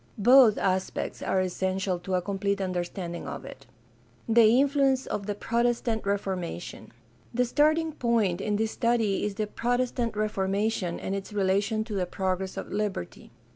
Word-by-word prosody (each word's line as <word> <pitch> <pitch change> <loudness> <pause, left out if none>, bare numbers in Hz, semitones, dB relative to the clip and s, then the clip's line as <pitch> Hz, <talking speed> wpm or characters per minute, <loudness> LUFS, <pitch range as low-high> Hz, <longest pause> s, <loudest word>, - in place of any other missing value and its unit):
Both 240 +1 +6
aspects 185 0 -1
are 190 - 0
essential 185 0 -1
to 185 +1 -2
a 180 - 0
complete 200 0 -1
under 185 -2 -1
standing 175 -1 -6
of - - -6
it. 135 -1 -11 0.6
The 230 +1 +6
influence 275 -2 +2
of 200 -1 -4
the 205 - -2
Protestant 235 -1 0
Reformation. 190 -4 -3 0.2
— 120 0 -31
The 250 +1 +3
starting 310 +5 +2
point 225 - 0
in 210 +1 0
this 220 +1 0
study 230 -5 +1
is 210 -1 -2
the 215 0 -1
Protestant 245 0 -1
Reformation 200 -2 -1
and 195 - -4
its 195 +1 -5
relation 205 +2 +1
to 220 -1 -7
the 185 -3 -1
progress 190 0 -2
of - - -6
liberty. 205 - -4
205 Hz, 160 wpm, -27 LUFS, 190-235 Hz, 0.6 s, Both